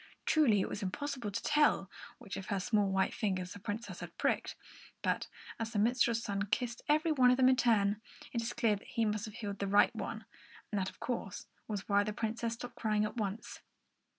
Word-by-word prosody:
Truly, 245 -11 +4
it - - -1
was 210 - -5
impossible 255 +3 -3
to 200 - -4
tell 295 -10 +3 0.3
which 195 - -7
of 195 - -6
her 200 - 0
small 205 0 +2
white 190 0 +1
fingers 185 -4 -1
the 205 - -9
Princess 215 +3 -5
had - - -9
pricked, - - 0 0.5
but - - 0 0.3
as 225 +1 -3
the - - -1
minstrel's 235 +1 +3
son 200 -1 -2
kissed 235 +3 -1
every 310 +2 +3
one 255 -4 +5
of 250 - +4
them 260 -1 +6
in 260 - +5
turn, 215 -4 +3 0.3
it 235 - 0
is 230 - -2
clear 230 -3 +2
that 200 - -12
he 230 - 0
must 210 +1 -1
have 215 -1 -9
healed 205 -3 -5
the 200 - -1
right 205 +1 +4
one; - - -5 0.5
and 205 -2 0
that, 190 - -1
of - - -18
course, 230 -6 -4 0.2
was 205 -3 -4
why 205 0 +4
the 210 +1 -3
Princess 230 +1 -2
stopped 245 +1 -8
crying 215 -1 +1
at 215 - -5
once. 210 0 -4
215 Hz, 215 wpm, -33 LUFS, 200-240 Hz, 0.5 s, them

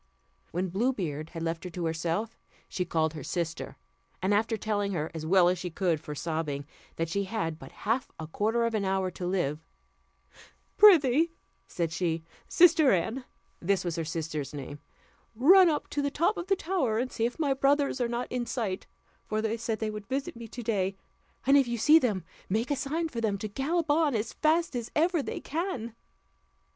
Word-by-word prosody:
When 180 +2 -2
Blue 230 +9 +1
Beard 155 - -4
had 165 -1 -6
left 165 0 -2
her 180 - -5
to 175 0 -4
herself, 165 +7 -2 0.3
she 180 - -2
called 160 -2 0
her 155 - -7
sister; 165 0 -3 0.4
and 190 +2 +1
after 220 +2 +1
telling 205 -2 -1
her, 160 -3 -2
as 160 -1 -5
well 180 0 +5
as 180 0 +1
she 180 - -4
could 170 -2 0
for 150 -1 -7
sobbing, 150 -3 -3 0.3
that 165 - -1
she 200 +5 -1
had 165 -6 -3
but - - -11
half 230 +5 -1
a 160 - -4
quarter 220 +8 0
of 230 - -1
an 215 -2 0
hour 190 -1 0
to 180 +1 -5
live; 160 -5 -1 1.1
"Prithee," 330 - +6 0.3
said 170 -2 -2
she, 165 -1 -1 0.2
"sister 330 -5 +6
Anne," 220 +9 0 0.3
(this 185 0 0
was 170 -2 -1
her 165 - -2
sister's 155 -3 -4
name), 145 +1 -7 0.6
"run 355 - +7
up 300 - -1
to 290 - -1
the 285 - 0
top 335 +9 +1
of 345 - -5
the 390 - +3
tower, 325 -12 0
and 250 +2 -1
see 230 - 0
if 245 - -8
my 295 -4 +1
brothers 275 0 +2
are 240 - +2
not 240 +1 -2
in 245 -1 -2
sight, 205 -7 -3 0.4
for 215 - -1
they 220 +1 0
said 225 -1 -2
they 215 0 -2
would 210 -1 -7
visit 270 +1 -3
me 230 -1 -8
to 240 +2 -8
day, 195 -4 0 0.5
and 275 +2 +6
if 270 - +2
you 235 0 -2
see 300 +8 +6
them, 210 - 0 0.3
make 225 +8 0
a - - +3
sign 305 +5 -1
for 235 -7 -5
them 210 -3 0
to 215 - -4
gallop 300 +8 -1
on 300 -3 +3
as 220 +1 -2
fast 315 -1 +1
as 235 -2 -3
ever 335 +1 +3
they - - -4
can." 280 - -3
215 Hz, 200 wpm, -29 LUFS, 175-270 Hz, 1.1 s, run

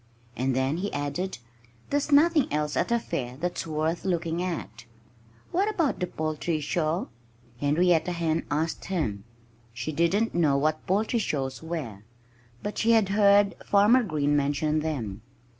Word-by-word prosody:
And 130 +2 0
then 130 +4 0
he 200 +3 -3
added, 145 +7 -3 0.5
"There's 290 +1 0
nothing 300 0 +4
else 150 0 -1
at - - 0
a 235 - +4
fair 125 - -4
that's 175 +2 -3
worth 160 +2 -1
looking 170 -2 -1
at." 115 - -5 0.7
"What 390 +5 +1
about 335 -9 0
the 180 - -1
poultry 155 0 -2
show?" 155 +3 -1 0.5
Henrietta 165 +4 +2
Hen 165 -1 0
asked 155 +3 -2
him. 115 - -2 0.5
She 120 +6 -4
didn't 170 +9 +1
know 155 -5 +3
what 155 +2 -1
poultry 215 +5 +1
shows 135 -9 -2
were; 160 -11 -5 0.6
but 205 - -4
she 230 +1 +4
had 220 -4 +3
heard 200 0 +5
Farmer 210 +5 +5
Green 150 -8 0
mention 145 +2 +1
them. 120 -10 -3
160 Hz, 145 wpm, -27 LUFS, 145-200 Hz, 0.7 s, heard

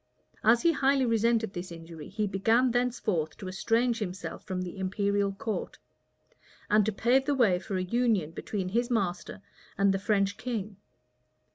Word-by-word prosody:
As 230 +2 +5
he 335 - +5
highly 275 -3 +2
resented 230 -2 +1
this 175 0 -6
injury, 165 -2 -9
he 210 +2 -1
began 225 +6 +2
thenceforth 230 -10 -1
to 190 - -7
estrange 230 +5 +1
himself 190 -3 -5
from 185 -2 -3
the 180 +2 -7
imperial 200 +1 0
court, 210 +2 -4 0.9
and 210 0 +5
to - - +2
pave 245 +6 +2
the 285 - +1
way 210 -9 +3
for 190 +1 -4
a 185 - -1
union 215 -5 +1
between 185 +2 -4
his 235 +5 0
master 195 -3 -2 0.3
and 195 0 +3
the 195 - -1
French 200 -1 +1
king. 215 -5 -4
205 Hz, 160 wpm, -29 LUFS, 190-235 Hz, 0.9 s, As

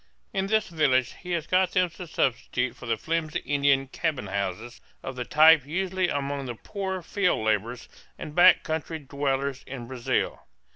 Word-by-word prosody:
In 195 0 0
this 220 +1 +2
village 140 - +2
he 180 - -10
has 165 -3 -1
got 185 +1 +2
them 180 -2 +2
to 180 +1 -9
substitute 125 -3 -1
for 125 - -10
the 115 -1 0
flimsy 160 +3 -2
Indian 140 -1 +2
cabins 135 - -3
houses 100 +5 -4 0.2
of 135 - -5
the 125 -1 -4
type 155 -1 +6
usual 185 +4 -1
among 140 -2 -2
the 120 - -5
poorer 190 - -5
field 180 - 0
laborers 110 +3 -1 0.3
and 150 - -7
back 180 +3 +6
country 160 0 -3
dwellers 140 -1 -2
in 125 -2 -7
Brazil. 125 -1 -2
145 Hz, 165 wpm, -26 LUFS, 125-175 Hz, 0.3 s, type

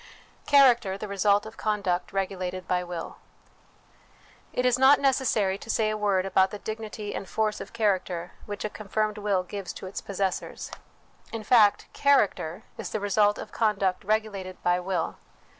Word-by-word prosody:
Character 240 -9 +5
the 210 - -6
Result 200 +1 +2
of 220 +1 -10
Conduct 200 -4 -1
regulated 185 -2 -3
by 180 0 +1
Will. 175 -2 -6 1.3
It 250 - -1
is 250 0 +3
not 265 +2 +7
necessary 230 -8 +1
to 225 - -12
say 215 -1 +1
a - - -1
word 200 -3 +1
about 190 0 +3
the 210 - -6
dignity 215 -1 -6
and 195 - -6
force 215 -1 -1
of - - -8
character 185 -6 -1 0.2
which 205 0 -5
a - - -1
confirmed 215 0 -2
will 200 -3 +1
gives 195 +1 -6
to - - -9
its 185 - -5
possessors. 195 -1 -3 0.6
In 225 -1 -5
fact, 215 -3 +5
character 210 - +2 0.2
is - - -4
the 215 - -2
result 205 +1 +2
of - - -8
conduct 195 -4 0
regulated 200 -3 -2
by 175 0 +3
will. 180 -2 -2
205 Hz, 160 wpm, -27 LUFS, 190-215 Hz, 1.3 s, not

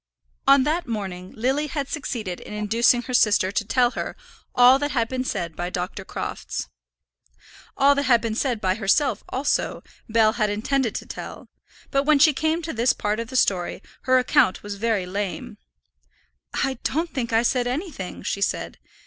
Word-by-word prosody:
On 275 -1 +7
that 320 +4 -1
morning 190 -5 -5
Lily 265 +6 0
had 280 -1 -3
succeeded 225 - -4
in 210 - -9
inducing 230 +3 +2
her 255 - -6
sister 205 -5 +3
to 215 +2 0
tell 245 +3 +2
her - - -5 0.4
all 250 +2 +7
that 290 0 -1
had 235 -5 0
been 255 +1 -2
said 175 -10 -3
by 175 0 -3
Dr. 180 +1 -4
Crofts. - - -5 1.1
All 280 +1 +6
that 280 0 -1
had 235 -2 +6
been 225 -1 -3
said 240 0 -1
by 185 -2 +1
herself 220 +4 +1
also, 270 +3 -1 0.3
Bell 220 -1 +4
had 215 -3 0
intended 230 +3 0
to - - -4
tell; - - -8 0.4
but 275 - +3
when 305 0 +5
she 300 +2 +6
came 315 +4 0
to 320 - -4
this 235 +1 +2
part 210 +1 -2
of 230 - -4
the 260 - -9
story, 185 -5 +1 0.2
her 255 0 +5
account 255 -4 +3
was 205 0 -5
very 210 -2 0
lame. 195 +1 -4 0.9
"I 265 0 -1
don't 325 +4 -1
think 240 -4 -2
I 225 +1 +3
said 245 0 +1
anything," 265 - -5
she 200 - -2
said. - - -2
240 Hz, 180 wpm, -24 LUFS, 205-275 Hz, 1.1 s, On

